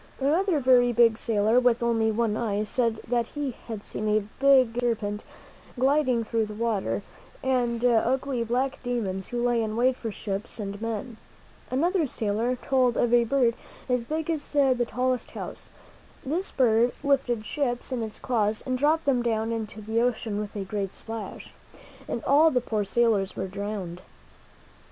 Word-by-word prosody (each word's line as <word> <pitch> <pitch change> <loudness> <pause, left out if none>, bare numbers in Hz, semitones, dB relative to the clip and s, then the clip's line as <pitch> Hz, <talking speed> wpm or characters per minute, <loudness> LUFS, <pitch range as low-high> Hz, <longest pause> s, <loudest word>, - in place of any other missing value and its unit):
Another 320 +5 +2
very 250 -2 +5
big 235 -1 +5
sailor, 220 +1 +3
with 245 -1 +2
only 225 -2 +2
one 220 -1 0
eye, 210 -2 -1
said 230 0 0
that 235 -1 +1
he 290 -3 -3 0.2
had 220 -3 -6
seen 215 - -4
a 210 -1 +2
big 260 -4 +5
serpent 215 -4 -1 0.5
gliding 260 -2 +2
through 225 0 -1
the 210 - -8
water, 215 -3 -1 0.4
and 245 -2 +1
ugly 245 +2 +2
black 255 +4 -1
demons 210 -7 -2
who 240 0 -2
lay 240 -1 +2
in 215 -1 -2
wait 255 +2 +3
for 230 -3 -5
ships 200 +2 -5
and 200 0 -5
men. 230 +1 -4 0.5
Another 330 +5 +1
sailor 225 +2 -1
told 250 -1 +1
of 240 0 +2
a 240 -1 +5
bird 245 -1 +2 0.3
as 250 -2 +1
big 315 +5 -2
as 305 -3 -4
the 260 -4 +3
tallest 255 0 -1
house. - - -8 0.6
This 335 +8 -1
bird 240 -2 +3
lifted 255 -6 +1
ships 250 -3 -2
in 250 -2 -1
its 220 -1 -5
claws 215 -4 0
and 255 -1 -1
dropped 310 +3 +2
them 265 -3 +2
down 225 -1 0
into 220 -1 -4
the 220 +2 0
ocean 225 -3 -1
with 210 0 -5
a 200 -2 -3
great 195 -1 -3
splash, 225 -3 -7 0.5
and 235 - -3
all 300 +4 +5
the 255 - +2
poor 220 -3 -1
sailors 210 -2 +1
were 190 - -3
drowned. 195 -3 -5
235 Hz, 165 wpm, -26 LUFS, 215-255 Hz, 0.6 s, very